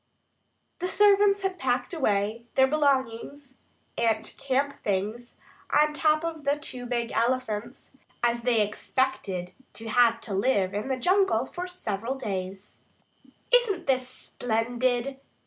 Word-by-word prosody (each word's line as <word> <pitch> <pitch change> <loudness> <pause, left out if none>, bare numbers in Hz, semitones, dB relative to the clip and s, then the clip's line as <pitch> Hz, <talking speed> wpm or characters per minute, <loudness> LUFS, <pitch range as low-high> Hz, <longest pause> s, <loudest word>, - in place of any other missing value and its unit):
The 360 - -1
servants 400 0 +4
had 380 -2 -2
packed 250 +3 -1
away 220 -6 0
their 265 - +6
belongings 275 -1 -1 0.4
and 225 -2 +1
camp 275 +1 -1
things 210 +5 -2 0.3
on 300 0 +3
top 310 +1 +2
of 325 -2 -4
the 285 +1 +1
two 250 -4 -5
big 235 -1 -2
elephants, 235 -1 -2 0.3
as 235 0 +2
they 235 -2 +2
expected 210 -6 -2 0.2
to 225 0 -7
have 230 0 +4
to 210 - -5
live 195 -2 +1
in 205 +5 -3
the 265 -1 -1
jungle 360 - +2
for 355 +6 -6
several 240 - -3
days. 195 -5 -5 0.7
"Isn't 415 -8 +3
this 255 -2 +1
splendid?" 245 +2 -1
255 Hz, 130 wpm, -27 LUFS, 225-290 Hz, 0.7 s, their